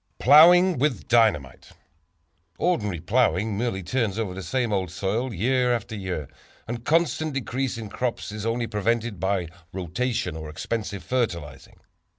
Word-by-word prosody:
Plowing 175 Hz, +4 st, +7 dB
With 145 Hz, -2 st, 0 dB
Dynamite. 105 Hz, -, +1 dB, 0.9 s
Ordinarily 105 Hz, -, 0 dB
plowing 105 Hz, 0 st, +1 dB
merely 105 Hz, -3 st, -2 dB
turns 110 Hz, 0 st, -1 dB
over 110 Hz, -5 st, -2 dB
the 95 Hz, -, -6 dB
same 120 Hz, +4 st, -1 dB
old 95 Hz, -3 st, -1 dB
soil 100 Hz, +8 st, -2 dB
year 125 Hz, +5 st, +1 dB
after 110 Hz, -1 st, -6 dB
year, 90 Hz, -8 st, -4 dB, 0.4 s
and 120 Hz, 0 st, -5 dB
constant 155 Hz, 0 st, +1 dB
decrease 135 Hz, -2 st, -2 dB
in 110 Hz, -2 st, -6 dB
crops 120 Hz, 0 st, -3 dB
is 105 Hz, -1 st, -6 dB
only 115 Hz, +1 st, -1 dB
prevented 110 Hz, -1 st, -1 dB
by 95 Hz, -1 st, 0 dB, 0.3 s
rotation 95 Hz, +2 st, -2 dB
or 80 Hz, -1 st, -7 dB
expensive 105 Hz, +5 st, -4 dB
fertilizing. 85 Hz, -, -3 dB
110 Hz, 140 wpm, -25 LUFS, 95-125 Hz, 0.9 s, Plowing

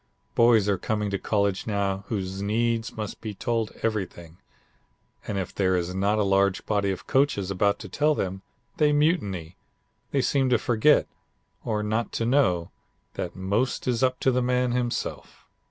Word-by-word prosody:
Boys 115 Hz, -3 st, +5 dB
are 100 Hz, -3 st, +1 dB
coming 105 Hz, +1 st, -1 dB
to 100 Hz, -, -1 dB
college 100 Hz, -2 st, 0 dB
now 100 Hz, -2 st, -1 dB
who 110 Hz, -, -1 dB, 0.2 s
needs 115 Hz, +3 st, 0 dB
must 105 Hz, -2 st, -5 dB
be 110 Hz, -3 st, -5 dB
told 115 Hz, +1 st, -1 dB
everything, 90 Hz, -6 st, -3 dB, 0.9 s
and 100 Hz, -, -2 dB
if 95 Hz, -, -3 dB
there 95 Hz, -2 st, +1 dB
is 90 Hz, 0 st, -1 dB
not 100 Hz, +3 st, +1 dB
a 105 Hz, -, +2 dB
large 100 Hz, -1 st, +2 dB
body 100 Hz, -2 st, +1 dB
of 95 Hz, -, -4 dB
coaches 130 Hz, -9 st, +1 dB
about 100 Hz, +1 st, +2 dB
to 105 Hz, -, -9 dB
tell 150 Hz, +10 st, +1 dB
them, 95 Hz, -3 st, -3 dB, 0.4 s
they 150 Hz, -1 st, +4 dB
mutiny. 105 Hz, -, 0 dB, 0.5 s
They 135 Hz, -2 st, +1 dB
seem 135 Hz, +1 st, +2 dB
to 125 Hz, -, +4 dB
forget, 120 Hz, +6 st, +3 dB, 0.6 s
or 105 Hz, -1 st, -1 dB
not 110 Hz, +2 st, -1 dB
to 115 Hz, -, -1 dB
know, 115 Hz, -10 st, +2 dB, 0.4 s
that -, -, -5 dB
most 100 Hz, +9 st, -1 dB
is 120 Hz, -2 st, +1 dB
up 130 Hz, -1 st, +2 dB
to 130 Hz, -, +3 dB
the 125 Hz, 0 st, +1 dB
man 125 Hz, 0 st, +1 dB
himself. 120 Hz, -1 st, -3 dB
105 Hz, 170 wpm, -26 LUFS, 100-120 Hz, 0.9 s, Boys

